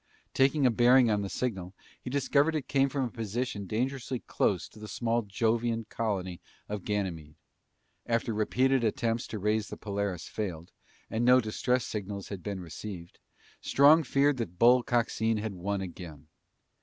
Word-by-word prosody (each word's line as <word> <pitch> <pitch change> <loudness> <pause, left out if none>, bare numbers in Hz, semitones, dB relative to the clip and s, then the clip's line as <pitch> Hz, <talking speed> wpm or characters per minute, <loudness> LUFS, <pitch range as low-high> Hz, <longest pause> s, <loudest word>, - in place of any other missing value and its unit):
Taking 135 +1 +3
a 125 - +5
bearing 120 +1 +5
on 105 -1 +1
the 100 - -4
signal, 95 -7 -3 0.3
he - - -6
discovered 140 +3 +2
it 150 - -3
came 135 -1 +2
from 135 0 -1
a 120 - -3
position 110 -2 -3
dangerously 130 +4 -2
close 90 -5 0
to 110 - -16
the 105 - -8
small 115 +1 0
Jovian 115 +2 0
colony 95 -6 -3 0.3
of 105 -2 -5
Ganymede. 90 -8 -3 0.7
After 115 -1 0
repeated 125 +4 +2
attempts 115 +1 0
to 110 - -5
raise 105 +1 0
the - - -8
Polaris 100 -4 -3
failed, 90 -6 -5 0.4
and 110 +2 0
no 125 +1 +6
distress 125 +2 0
signals 100 -2 -5
had 100 -3 -6
been 100 +1 -4
received, 85 0 -8 0.4
Strong 150 +3 +5
feared 140 +1 +2
that 90 -7 -5
Bull 125 +4 +6
Coxine 115 -2 0
had 105 -1 -3
won 95 +2 -3
again. 85 -5 -8
110 Hz, 160 wpm, -29 LUFS, 100-125 Hz, 0.7 s, no